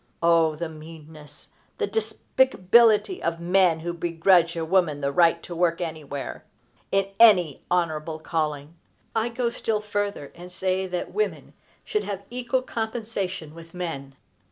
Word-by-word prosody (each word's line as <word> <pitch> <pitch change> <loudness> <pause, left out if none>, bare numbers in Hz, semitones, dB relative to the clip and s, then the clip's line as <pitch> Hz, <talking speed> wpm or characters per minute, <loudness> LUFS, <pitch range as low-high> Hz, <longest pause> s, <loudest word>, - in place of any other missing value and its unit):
O 165 -2 +4
the 170 +2 -4
meanness, 155 -2 -13 0.3
the - - -1
despicability 225 - +2
of 170 0 -2
men 175 -1 +3
who 170 +1 -3
begrudge 170 0 +3
a 165 - -2
woman 165 -4 +2
the 140 -1 -1
right 170 +2 +3
to 175 - -7
work 170 -1 +1
anywhere, 155 -5 -5 0.5
in 195 0 +1
any 180 - +6
honorable 160 -3 -1
calling! 155 -2 -3 0.4
I 225 +1 +1
go 235 0 -1
still 225 -2 -1
further, 205 -7 -3
and 180 +1 -11
say 190 +1 -1
that 180 -1 -4
women 430 +1 -2 0.3
should 425 - -1
have 200 -1 -5
equal 250 +1 -1
compensation 215 -9 -4
with 165 +1 -13
men. 140 -7 -5
175 Hz, 140 wpm, -25 LUFS, 160-205 Hz, 0.5 s, any